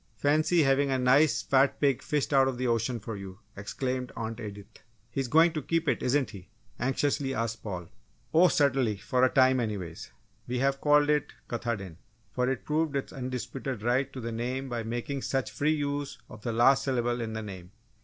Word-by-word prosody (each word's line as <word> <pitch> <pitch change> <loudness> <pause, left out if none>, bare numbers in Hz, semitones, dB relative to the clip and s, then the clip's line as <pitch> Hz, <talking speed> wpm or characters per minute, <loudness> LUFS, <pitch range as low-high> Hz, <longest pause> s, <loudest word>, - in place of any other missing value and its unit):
Fancy, 155 +6 +3
having 135 +1 +3
a 135 - +1
nice 125 -2 +4
fat 135 +5 +3
pig 140 -4 +2
fished 150 -1 -1
out 135 -1 +5
of 130 -2 -2
the 130 - -2
ocean 115 0 0
for 110 +1 -6
you!" 95 -2 -8 0.2
exclaimed 125 +5 -3
Aunt 115 0 -4
Edith. 105 0 -9 0.3
"He's 135 +1 -2
going 160 +5 +5
to 155 - -2
keep 165 +3 -1
it, - - +1
isn't 135 +1 +1
he?" 95 -4 -12 0.3
anxiously 135 +1 0
asked 115 0 -2
Paul. 90 -5 -5 0.5
"Oh, 170 +3 +7
certainly 135 - +2
for 125 +5 0
a 130 - +6
time, 130 0 +4
anyway. 100 -8 -3 0.5
We 125 - -2
have 135 +2 +1
called 150 0 +4
it 150 0 0
Katahdin, 110 -8 -4 0.3
for 125 0 0
it 130 -2 -3
proved 155 -1 0
its 135 - -3
undisputed 130 -2 -4
right 130 +3 +1
to 135 - -7
the 115 -1 -4
name 125 +4 -3
by 120 -1 -2
making 120 +5 -3
such 135 0 -1
free 155 +2 +1
use 145 -1 -3
of 105 - -11
the 120 - -2
last 130 +4 +4
syllable 120 -2 0
in 110 -1 -4
the 110 0 -4
name!" 95 -4 -8
130 Hz, 195 wpm, -28 LUFS, 115-140 Hz, 0.5 s, Oh